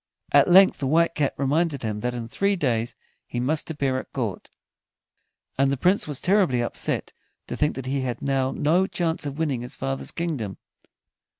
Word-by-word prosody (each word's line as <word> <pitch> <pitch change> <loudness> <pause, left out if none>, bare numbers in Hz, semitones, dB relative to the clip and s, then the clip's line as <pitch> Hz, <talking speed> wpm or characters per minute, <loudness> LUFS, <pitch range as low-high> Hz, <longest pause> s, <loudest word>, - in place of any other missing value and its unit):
At - - +5
length 190 +2 +6
the 135 - -1
White 165 +4 +3
Cat 145 -3 -1
reminded 145 +1 0
him 105 -2 -2
that 125 +3 -2
in 115 -1 -5
three 200 - 0
days 120 -8 -1 0.3
he 120 - -4
must 150 +7 +1
appear 140 -4 -1
at - - -11
court, 110 -8 -4 1.1
and 135 0 +3
the 140 - -1
Prince 180 +7 +2
was 145 -3 -3
terribly 185 -10 +2
upset 120 - -2 0.3
to - - -5
think 150 0 0
that 135 - -6
he 135 +1 -1
had 125 -2 -3
now 135 -1 0
no 165 +7 +1
chance 165 -5 -2
of 140 0 -6
winning 145 -7 -1
his 125 - -7
father's 135 0 -1
kingdom. 140 - -2
140 Hz, 185 wpm, -24 LUFS, 125-165 Hz, 1.1 s, length